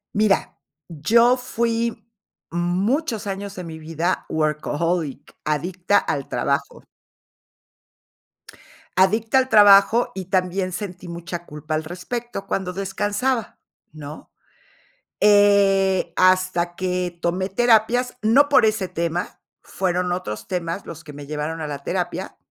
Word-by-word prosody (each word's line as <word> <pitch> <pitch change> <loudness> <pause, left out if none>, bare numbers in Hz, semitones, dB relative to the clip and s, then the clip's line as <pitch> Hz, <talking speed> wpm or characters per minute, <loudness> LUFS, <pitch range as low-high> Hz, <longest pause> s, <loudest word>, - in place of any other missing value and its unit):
Mira, 210 -1 +1 0.3
yo 230 - +3
fui 235 -3 -2 0.5
muchos 205 - -1
años 200 +1 -5
de 180 - -6
mi 160 -2 -8
vida 165 +3 -2
workaholic, 155 0 -2
adicta 175 +6 0
al 140 -3 -3
trabajo. 140 +3 -2 2.1
Adicta 220 +6 +3
al 260 -1 +3
trabajo 205 +2 +6
y 190 -1 -6
también 185 0 -1
sentí 180 -2 -6
mucha 170 0 -6
culpa 150 +1 -5
al 155 - -1
respecto 195 +5 -5
cuando 190 -2 -2
descansaba, 205 +5 -2 0.4
¿no? 150 0 -10 0.9
Eh, 200 -3 +4
hasta 185 -2 +2
que 180 -1 -2
tomé 185 +2 0
terapias, 240 +4 +2
no 260 +7 +5
por 285 - +5
ese 215 -3 0
tema, 170 +1 -3 0.2
fueron 180 -1 -1
otros 105 -12 -5
temas 175 +1 -3
los 165 +1 -9
que 150 - -10
me 145 0 -10
llevaron 150 +2 -4
a 155 - -3
la 140 -1 -6
terapia, 180 +1 -3
185 Hz, 115 wpm, -22 LUFS, 170-205 Hz, 2.1 s, trabajo